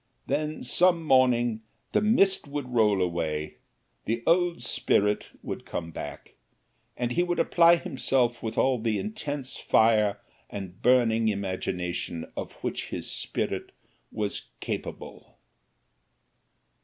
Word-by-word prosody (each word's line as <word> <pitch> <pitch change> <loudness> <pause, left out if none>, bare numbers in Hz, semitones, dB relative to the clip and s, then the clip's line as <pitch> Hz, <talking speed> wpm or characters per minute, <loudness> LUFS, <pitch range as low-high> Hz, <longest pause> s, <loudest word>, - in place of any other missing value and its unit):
Then 155 +1 -2
some 175 -2 +3
morning 120 -5 +3 0.3
the - - +2
mist 200 -6 +3
would 140 -3 -5
roll 105 -5 +3
away, 80 -3 -2 0.5
the 115 +1 -2
old 175 -6 +2
spirit 105 -2 +1 0.2
would - - -5
come 85 -1 -5
back, - - -8 0.6
and 120 -1 -1
he 175 - +2
would 175 0 0
apply 170 0 +5
himself 130 -6 0
with 110 - -4
all 130 -2 +3
the 110 -1 0
intense 145 -11 -4
fire 110 -2 +3 0.3
and 95 -2 -8
burning 115 -2 +4
imagination 90 -4 -2
of - - -5
which - - -3
his - - -4
spirit - - -3 0.4
was 105 -2 -3
capable. - - -6
120 Hz, 120 wpm, -27 LUFS, 105-145 Hz, 0.6 s, apply